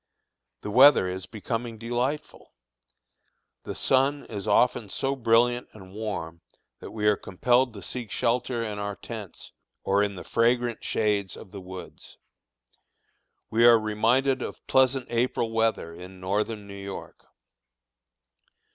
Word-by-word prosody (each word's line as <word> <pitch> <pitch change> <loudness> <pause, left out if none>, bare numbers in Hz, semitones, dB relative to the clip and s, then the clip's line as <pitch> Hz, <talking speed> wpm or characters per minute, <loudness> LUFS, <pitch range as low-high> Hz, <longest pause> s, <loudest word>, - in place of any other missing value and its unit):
The 105 - -5
weather 130 -3 +7
is 90 -1 -5
becoming 115 +1 -4
delightful. 120 +6 -3 1.1
The - - -5
sun 135 +2 +2
is 105 -1 -6
often 110 0 +2
so 135 +6 -1
brilliant 120 0 +2
and 95 -3 -13
warm 100 -6 -5 0.4
that - - -9
we 105 -1 -4
are 105 0 +5
compelled 125 +7 +1
to 100 - -9
seek 120 +1 -5
shelter 120 0 0
in 105 -1 -5
our 100 0 -3
tents 110 -5 -8 0.3
or 100 +1 +2
in 100 -1 -1
the 90 - -8
fragrant 120 0 +1
shades 105 -3 0
of 95 - -12
the 100 - -8
woods. 95 0 -10 1.3
We 115 +1 +3
are 120 -1 +8
reminded 120 +5 +1
of - - -7
pleasant 130 -1 +3
April 120 -1 0
weather 110 -7 0
in 90 +2 -11
Northern 105 +3 -2
New 100 - -10
York. 100 -1 -9
115 Hz, 135 wpm, -26 LUFS, 100-120 Hz, 1.3 s, are